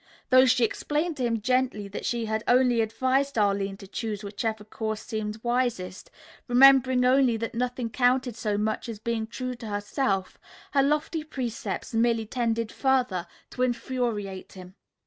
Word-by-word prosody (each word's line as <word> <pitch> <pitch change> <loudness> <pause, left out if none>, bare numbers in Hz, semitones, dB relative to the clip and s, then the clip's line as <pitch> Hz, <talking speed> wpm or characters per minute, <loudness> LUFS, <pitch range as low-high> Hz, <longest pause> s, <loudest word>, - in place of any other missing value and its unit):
Though 255 +1 +7
she 250 -1 +3
explained 300 +7 -2
to 255 - -2
him 230 -2 -1
gently 250 -4 0
that 200 - -5
she 235 -1 -1
had 220 0 -2
only 245 -2 +4
advised 260 +5 0
Arline 200 -2 +1
to 195 - -12
choose 215 0 -4
whichever 215 +1 -3
course 220 0 -4
seemed 215 -1 -4
wisest, 240 -7 -1 0.4
remembering 260 0 +6
only 255 -2 +4
that 230 +2 -4
nothing 245 -1 -2
counted 250 0 +2
so 215 -2 -1
much 215 +3 -2
as 225 - -5
being 220 +1 -2
true 255 +2 -4
to 235 -2 -9
herself, 205 -1 -2 0.3
her 275 - +4
lofty 300 +3 0
precepts 255 -9 -4
merely 225 0 +2
tended 230 -1 -1
further 250 -10 +1 0.2
to - - -5
infuriate 235 -6 -2
him. 185 -1 -11
235 Hz, 155 wpm, -26 LUFS, 215-255 Hz, 0.4 s, Though